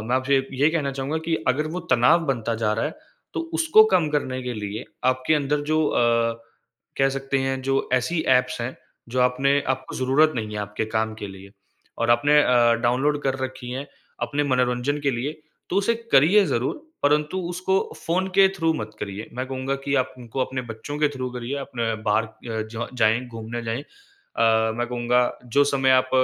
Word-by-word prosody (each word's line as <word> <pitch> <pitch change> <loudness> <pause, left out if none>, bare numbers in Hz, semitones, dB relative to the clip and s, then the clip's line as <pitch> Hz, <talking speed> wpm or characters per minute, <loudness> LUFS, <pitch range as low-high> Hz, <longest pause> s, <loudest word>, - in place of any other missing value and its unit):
मैं 120 +4 0
आपसे 130 +1 +2 0.2
ये 145 +4 +3
कहना 150 -4 -1
चाहूँगा 135 +3 -3
कि 165 - 0
अगर 145 +4 +1
वो 180 +3 -4
तनाव 125 +8 +5
बनता 120 -4 -1
जा 110 -1 0
रहा 110 - -1
है, - - -3 0.4
तो - - -1
उसको 425 +7 +6
कम 170 - +2
करने 130 -3 -1
के 125 -1 -4
लिए 105 +1 -5 0.2
आपके 130 +4 +2
अंदर 145 0 0
जो 155 0 +3
अ, 115 -2 +1 0.6
कह 135 0 +4
सकते 135 0 -2
हैं, 135 0 -1
जो 135 0 0
ऐसी 160 +7 +1 0.2
ऐप्स 125 -1 -4
हैं, 120 +2 -4 0.3
जो 125 +2 -1
आपने 135 +3 +3
आपको 130 0 -2
ज़रूरत 140 +5 +3
नहीं 110 -3 -3
है 105 - -4
आपके 105 +2 -3
काम 110 0 -1
के 110 -2 -6
लिए 95 0 -12 0.5
और - - +1
आपने 145 +6 +5
अ, 120 -2 +4
डाउनलोड 140 +5 +1
कर 135 -1 0
रखी 130 -1 -7
हैं, 135 +3 -4 0.4
अपने 145 0 0
मनोरंजन 125 +1 +1
के 140 -1 +1
लिए, 135 +6 -4 0.3
तो 185 - 0
उसे 205 +4 +2 0.2
करिए 180 +10 +6
ज़रूर 130 - -1 0.2
परन्तु 150 +4 +2
उसको 185 +2 -1 0.2
फ़ोन 180 +3 -1
के 195 0 +8
थ्रू 165 -2 +2
मत 110 -6 -4
करिए। 100 +2 -5
मैं 130 +1 -3
कहूँगा 135 +1 -3
कि 140 - 0
आप 130 0 0
उनको 120 +2 -5
अपने 130 -1 -4
बच्चों 115 +7 -6
के 150 -1 +3
थ्रू 130 -3 -4
करिए, 125 +3 -4
अपने 115 -4 -2
बाहर 110 +1 +2
अ, 110 +1 -6
जाएँ 110 0 +3
घूमने 115 0 -6
जाएँ 115 +3 -2
अ, 115 - -1
मैं 120 0 -1
कहूँगा 125 0 +1 0.2
जो 145 - +7
समय 135 -2 +2
आप 130 0 +4
130 Hz, 190 wpm, -24 LUFS, 120-145 Hz, 0.6 s, के